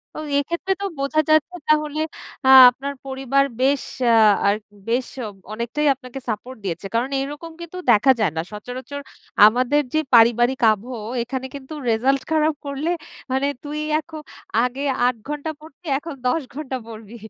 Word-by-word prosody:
তো -, -, -5 dB, 0.2 s
এক্ষেত্রে 340 Hz, +6 st, -1 dB
তো -, -, -1 dB
বোঝা 280 Hz, +3 st, 0 dB
যাচ্ছে 310 Hz, +3 st, +3 dB
তাহলে 305 Hz, 0 st, +1 dB, 0.5 s
আ -, -, +4 dB, 0.2 s
আপনার 275 Hz, +3 st, -5 dB
পরিবার 270 Hz, +1 st, +1 dB, 0.2 s
বেশ 275 Hz, +1 st, +2 dB, 0.6 s
আ -, -, +6 dB, 0.4 s
বেশ 245 Hz, +2 st, 0 dB, 0.5 s
অনেকটাই 235 Hz, +7 st, -1 dB
আপনাকে 255 Hz, 0 st, -9 dB
সাপোর্ট 235 Hz, +4 st, -5 dB
দিয়েছে। 175 Hz, 0 st, -4 dB
কারণ 245 Hz, +4 st, +1 dB
এরকম 295 Hz, +4 st, -6 dB
কিন্তু 340 Hz, +2 st, -8 dB
দেখা 240 Hz, +5 st, +5 dB
যায় 200 Hz, -8 st, +2 dB
না। -, -, +1 dB
সচরাচর 255 Hz, +6 st, -7 dB, 0.4 s
আমাদের 255 Hz, +6 st, +3 dB
যে 310 Hz, -, +3 dB
পারিবারিক 240 Hz, +3 st, +5 dB
আবহ, 225 Hz, +5 st, -4 dB, 0.3 s
এখানে 260 Hz, +2 st, -5 dB
কিন্তু 280 Hz, +2 st, -9 dB, 0.2 s
রেজাল্ট 260 Hz, +5 st, +2 dB
খারাপ 310 Hz, -1 st, +2 dB
করলে 280 Hz, +4 st, -3 dB, 0.4 s
মানে 265 Hz, +2 st, +1 dB, 0.2 s
তুই 300 Hz, +1 st, -5 dB, 0.2 s
এখন 315 Hz, -1 st, -9 dB, 0.4 s
আগে 250 Hz, +2 st, -2 dB, 0.2 s
৮ 250 Hz, -1 st, +2 dB
ঘন্টা 295 Hz, +1 st, -4 dB
পড়তি 315 Hz, +2 st, -17 dB
এখন 320 Hz, +1 st, -7 dB
১০ 310 Hz, +6 st, +1 dB
ঘণ্টা 270 Hz, -3 st, -4 dB
পড়বি। 220 Hz, 0 st, -10 dB
270 Hz, 150 wpm, -22 LUFS, 245-300 Hz, 0.6 s, আ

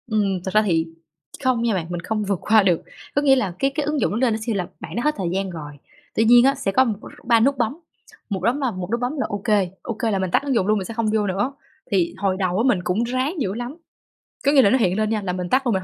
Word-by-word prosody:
Ừm, 205 Hz, -4 st, 0 dB
thât 190 Hz, -, -3 dB
ra 215 Hz, -, +5 dB
thì 165 Hz, -6 st, +1 dB, 0.6 s
không 255 Hz, -3 st, +2 dB
nha 235 Hz, -2 st, +1 dB
bạn, 180 Hz, -4 st, -1 dB
mình 175 Hz, -1 st, -3 dB
không 215 Hz, +4 st, -2 dB
vượt 200 Hz, -3 st, -1 dB
qua 215 Hz, -1 st, +4 dB
được. 180 Hz, -4 st, +2 dB, 0.3 s
Có 285 Hz, -, +3 dB
nghĩa 275 Hz, -2 st, +5 dB
là 205 Hz, -9 st, -1 dB
cái 275 Hz, 0 st, +2 dB
cái 300 Hz, -2 st, -1 dB
ứng 300 Hz, -1 st, -1 dB
dụng -, -, +1 dB
nó 210 Hz, -, -1 dB
lên 240 Hz, -2 st, +2 dB
nó 220 Hz, -, -2 dB
sẽ 230 Hz, -, +1 dB
là 185 Hz, -4 st, -2 dB
bạn -, -, -8 dB
đã 240 Hz, -, -1 dB
hết 300 Hz, 0 st, +1 dB
thời 185 Hz, -4 st, -2 dB
gian 190 Hz, +2 st, -2 dB
rồi, 150 Hz, -4 st, -8 dB, 0.4 s
tuy 225 Hz, -, +3 dB
nhiên 240 Hz, +2 st, +7 dB
á 275 Hz, +1 st, +4 dB
sẽ 230 Hz, -7 st, -2 dB
có, 225 Hz, -, +4 dB
ừm, 235 Hz, -4 st, 0 dB, 0.3 s
3 230 Hz, -1 st, +4 dB
nút 275 Hz, +4 st, +2 dB
bấm, 245 Hz, +7 st, -1 dB, 0.5 s
một 195 Hz, -3 st, -2 dB
bấm 245 Hz, +7 st, +1 dB
là 260 Hz, -3 st, 0 dB
một 185 Hz, -2 st, -6 dB
nút 235 Hz, -, 0 dB
bấm 250 Hz, +5 st, -2 dB
là 275 Hz, -, 0 dB
OK 205 Hz, +1 st, +1 dB, 0.3 s
OK 225 Hz, 0 st, -2 dB
là 195 Hz, -, 0 dB
mình 185 Hz, -2 st, -2 dB
tắt -, -, +2 dB
ứng 280 Hz, -2 st, -1 dB
dụng 195 Hz, -4 st, +1 dB
luôn 215 Hz, 0 st, +3 dB
mình 190 Hz, -, -3 dB
sẽ 230 Hz, -, -6 dB
không 225 Hz, -1 st, -1 dB
vô 210 Hz, -2 st, +1 dB
nữa. 205 Hz, +8 st, -1 dB, 0.4 s
Thì 180 Hz, -4 st, +1 dB
hồi 190 Hz, -2 st, 0 dB
đầu 185 Hz, -1 st, 0 dB
á 225 Hz, -, +2 dB
mình 210 Hz, -8 st, +3 dB
cũng 185 Hz, +6 st, 0 dB
ráng 255 Hz, +7 st, -1 dB
dữ 190 Hz, -5 st, -1 dB
lắm, 245 Hz, +7 st, -6 dB, 0.7 s
có 280 Hz, -, +5 dB
nghĩa 285 Hz, -2 st, +6 dB
là 200 Hz, -, +5 dB
nó 260 Hz, -, +4 dB
hiện 190 Hz, -6 st, +1 dB
lên 215 Hz, 0 st, +1 dB
nha 215 Hz, -1 st, 0 dB
là 185 Hz, -2 st, -3 dB
mình 180 Hz, -1 st, -4 dB
tắt 260 Hz, +4 st, +2 dB
luôn, 235 Hz, -, +2 dB
mình 190 Hz, -1 st, -1 dB
215 Hz, 305 wpm, -22 LUFS, 190-250 Hz, 0.7 s, nhiên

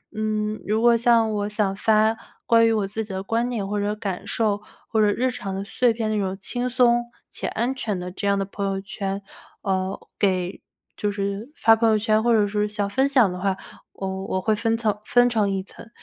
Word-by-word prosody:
嗯， 215 Hz, 0 st, -1 dB
如 215 Hz, +2 st, +1 dB
果 235 Hz, 0 st, +6 dB
像 230 Hz, -1 st, +3 dB
我 205 Hz, 0 st, -1 dB
想 210 Hz, -2 st, 0 dB
发， 220 Hz, +2 st, +3 dB, 0.3 s
关 230 Hz, 0 st, +5 dB
于 -, -, +3 dB
我 210 Hz, -3 st, 0 dB
自 220 Hz, +3 st, -3 dB
己 210 Hz, -, -10 dB
的 190 Hz, 0 st, -3 dB
观 230 Hz, +4 st, 0 dB
点 220 Hz, -5 st, -2 dB
或 205 Hz, +1 st, -1 dB
者 205 Hz, +1 st, -1 dB
感 200 Hz, -2 st, -5 dB
受， 210 Hz, -1 st, 0 dB, 0.3 s
或 220 Hz, -, +1 dB
者 210 Hz, -, +5 dB
日 255 Hz, +5 st, 0 dB
常 195 Hz, -6 st, -5 dB
的 195 Hz, -, -3 dB
碎 225 Hz, +4 st, +2 dB
片 220 Hz, -1 st, -2 dB
的 -, -, 0 dB
那 210 Hz, -, +1 dB
种 190 Hz, 0 st, -2 dB
轻 245 Hz, +5 st, -2 dB
松、 240 Hz, -1 st, +3 dB, 0.2 s
且 -, -, -5 dB
安 240 Hz, +4 st, -1 dB
全 215 Hz, -7 st, -3 dB
的 180 Hz, 0 st, -5 dB
这 200 Hz, +2 st, -4 dB
样 200 Hz, 0 st, +3 dB
的 195 Hz, -, -1 dB
朋 200 Hz, +1 st, -4 dB
友 195 Hz, 0 st, -1 dB
圈， 195 Hz, 0 st, -4 dB, 0.4 s
呃， 190 Hz, -1 st, -1 dB, 0.2 s
给 185 Hz, -2 st, 0 dB, 0.4 s
就 210 Hz, -, 0 dB
是 200 Hz, +3 st, -3 dB
发 225 Hz, -, +5 dB
朋 230 Hz, 0 st, +3 dB
友 220 Hz, -, +4 dB
圈 215 Hz, 0 st, +2 dB
或 240 Hz, 0 st, +3 dB
者 215 Hz, -2 st, +4 dB
是 210 Hz, +1 st, 0 dB
想 205 Hz, -1 st, -2 dB
分 265 Hz, +6 st, +2 dB
享 255 Hz, -8 st, +4 dB
的 180 Hz, -, -6 dB
话， 195 Hz, 0 st, 0 dB, 0.4 s
我， 190 Hz, 0 st, -4 dB
我 185 Hz, -1 st, -1 dB
会 215 Hz, -, +2 dB
分 225 Hz, +1 st, +1 dB
层 215 Hz, -3 st, -1 dB
分 245 Hz, +2 st, +4 dB
成 215 Hz, -4 st, +1 dB
一 195 Hz, -1 st, -1 dB
层。 225 Hz, -, -13 dB
210 Hz, 245 characters per minute, -24 LUFS, 195-225 Hz, 0.4 s, 果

